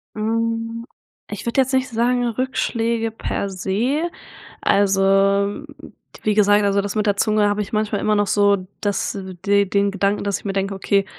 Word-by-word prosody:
Hm, 230 +1 -2 0.4
ich - - -6
würde 235 +3 0
jetzt 265 0 +2
nicht 260 +1 +1
sagen 245 +1 +1
Rückschläge 235 -2 -1
per 200 -2 -3
se, 210 - -1 0.6
also 195 -1 +2 1.2
wie 215 - +2
gesagt 205 0 +4
also 200 0 +2
das 200 +1 -4
mit 215 0 0
der 205 -1 +1
Zunge 210 0 +2
habe 205 +1 0
ich 205 - -7
manchmal 215 -1 0
immer 215 0 +1
noch 205 -1 +1
so 200 -2 +2
das 205 0 -2 0.3
de 200 0 +3
den 200 +1 +1
Gedanken, 200 +1 0
dass 200 -1 -1
ich - - -21
mir 195 - -2
denke: 195 0 -1
„Okay, 195 0 +1
210 Hz, 170 wpm, -21 LUFS, 200-230 Hz, 1.2 s, gesagt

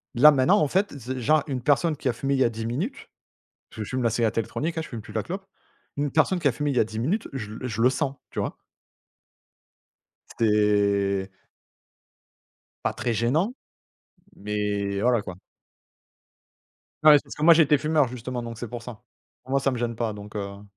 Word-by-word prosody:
là, 150 +5 +8
maintenant, 130 -2 +4
en 150 - +2
fait, 190 -1 0
c 130 +2 -5
genre 150 +5 +3
une 130 -4 -3
personne 150 +4 +2
qui 135 - -4
a 125 - +2
fumé 140 +3 -1
il 130 - 0
y - - +5
a 115 - +3
10 115 0 -5
minutes 180 - -4 0.6
je 110 - -7
fume 130 +4 -3
la 115 - +3
cigarette 115 -1 0
électronique, 160 +9 -2
hein, - - -1
je - - -10
fume 115 - -6
plus 105 - -12
la - - -2
clope. 190 +3 -5 0.5
Une 145 -1 -1
personne 170 +4 +3
qui 165 - -4
a 135 - +5
fumé 145 +4 -2
il 135 - -2
y - - +5
a - - +4
10 110 0 -5
minutes, 180 - -1
je 120 -6 -5
le 125 - -6
je 115 -2 -2
le 125 - +6
sens, 135 0 -1 0.2
tu - - -8
vois? - - -2 1.8
C'est 100 -3 +2 1.6
pas - - 0
très 120 - -2
gênant, 150 - +1 0.8
mais 100 -1 -2
voilà, 120 -1 +3
quoi. 90 - -7 1.7
Ouais, 150 -1 +9
parce - - -11
que 150 - -4
moi 170 - +9
j'étais 150 -3 +5
fumeur 150 -1 +2
justement, 125 0 -5
donc 115 -1 -7
c'est 120 0 -6
pour 120 0 -6
ça. 120 -1 -10 0.4
Moi, 135 +1 +1
ça 135 0 +1
me 125 - -3
gêne 115 0 -2
pas, 115 -2 -2
donc 105 +1 -8
heu 100 0 -6
125 Hz, 200 wpm, -25 LUFS, 110-145 Hz, 1.8 s, Ouais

